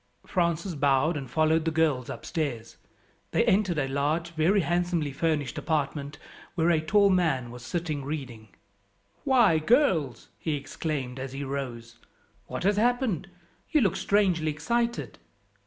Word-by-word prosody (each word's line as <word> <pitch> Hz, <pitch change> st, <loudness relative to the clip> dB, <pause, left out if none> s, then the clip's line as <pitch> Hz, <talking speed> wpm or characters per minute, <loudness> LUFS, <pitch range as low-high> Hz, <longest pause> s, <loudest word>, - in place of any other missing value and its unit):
Francis 170 Hz, +1 st, 0 dB
bowed 140 Hz, +2 st, +2 dB
and 135 Hz, -4 st, -5 dB
followed 155 Hz, +3 st, +2 dB
the 165 Hz, -, +1 dB
girls 155 Hz, -6 st, +1 dB
upstairs. 125 Hz, -8 st, -4 dB, 0.5 s
They -, -, +2 dB
entered 190 Hz, -4 st, +2 dB
a 140 Hz, -2 st, 0 dB
large, 150 Hz, +5 st, -1 dB
very 170 Hz, +5 st, +2 dB
handsomely 175 Hz, -3 st, 0 dB
furnished 150 Hz, -3 st, -1 dB
apartment 145 Hz, -2 st, -2 dB, 0.4 s
where 170 Hz, 0 st, +3 dB
a 160 Hz, -2 st, +2 dB
tall 200 Hz, +5 st, +4 dB
man 155 Hz, -10 st, +1 dB
was 120 Hz, 0 st, -10 dB
sitting 155 Hz, -1 st, -3 dB
reading. 130 Hz, -7 st, -6 dB, 0.8 s
"Why, 235 Hz, -, +4 dB
girls," 160 Hz, -, +2 dB
he 155 Hz, -2 st, -1 dB
exclaimed 140 Hz, -2 st, -4 dB
as 135 Hz, 0 st, -6 dB
he 140 Hz, +1 st, -4 dB
rose, 120 Hz, -4 st, -5 dB, 0.5 s
"what -, -, -5 dB
has 200 Hz, +2 st, +2 dB
happened? 235 Hz, -, +1 dB, 0.4 s
you 310 Hz, -, +3 dB
look 195 Hz, -7 st, +2 dB
strangely 185 Hz, -6 st, +2 dB
excited. 160 Hz, -, -2 dB
155 Hz, 140 wpm, -27 LUFS, 140-175 Hz, 0.8 s, tall